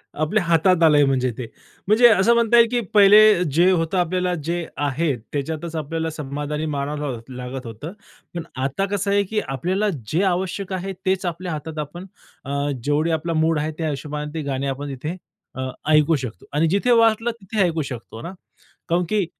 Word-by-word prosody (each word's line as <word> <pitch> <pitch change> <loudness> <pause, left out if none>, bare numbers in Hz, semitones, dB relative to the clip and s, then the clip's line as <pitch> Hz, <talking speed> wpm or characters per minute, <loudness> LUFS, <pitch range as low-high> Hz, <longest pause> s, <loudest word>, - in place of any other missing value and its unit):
आपल्या 155 +7 0
हातात 170 +1 +3
आलंय 150 -2 +6
म्हणजे 130 -2 +1
ते. 125 - -4 0.4
म्हणजे 230 +3 +6
असं 220 +1 +4
म्हणता 235 0 +4
येईल 235 0 +7
की 245 - +1
पहिले 210 -2 +7
जे 175 +3 +5
होतं 165 +1 0
आपल्याला 180 +1 0
जे 170 0 -1
आहे 145 +1 0 0.2
त्याच्यातच 160 +3 -4
आपल्याला 160 +1 -3
समाधानी 150 +1 -4
मानावं 145 -1 -3
लाग 130 -6 -4 0.2
लागत 125 +1 -6
होतं. 115 +8 -7 0.4
पण 170 - -3 0.2
आता 140 +9 -1
कसं 200 0 0
आहे 200 0 +3
की 210 +2 -2
आपल्याला 185 - -1 0.2
जे 170 +5 +2
आवश्यक 190 +1 -1
आहे 190 +1 -3
तेच 190 0 0
आपल्या 175 +1 -4
हातात 155 0 -5
आपण 150 +5 -6 0.4
अ, 140 - -5 0.3
जेवढे 150 +4 +1
आपला 165 +1 -1
मूड 160 -1 +2
आहे 155 +1 -2
ते - - -15
त्या 160 -2 -1
हिशोबाने 150 +1 -5
ते 160 - -3
गाणे 135 +1 -2
आपण 140 +2 -4
तिथे 150 +6 -5 0.4
अ, 130 0 -3 0.2
ऐकू 155 +1 +4
शकतो 125 - -6
आणि 155 +3 +2
जिथे 200 +7 +1
वाटलं 230 0 +4
तिथे 200 +2 -2
ऐकू 165 -3 0
शकतो 115 -2 -8
ना. 170 - -7 0.6
कारण 175 +2 +2
की 210 -3 +1
165 Hz, 185 wpm, -22 LUFS, 145-190 Hz, 0.6 s, येईल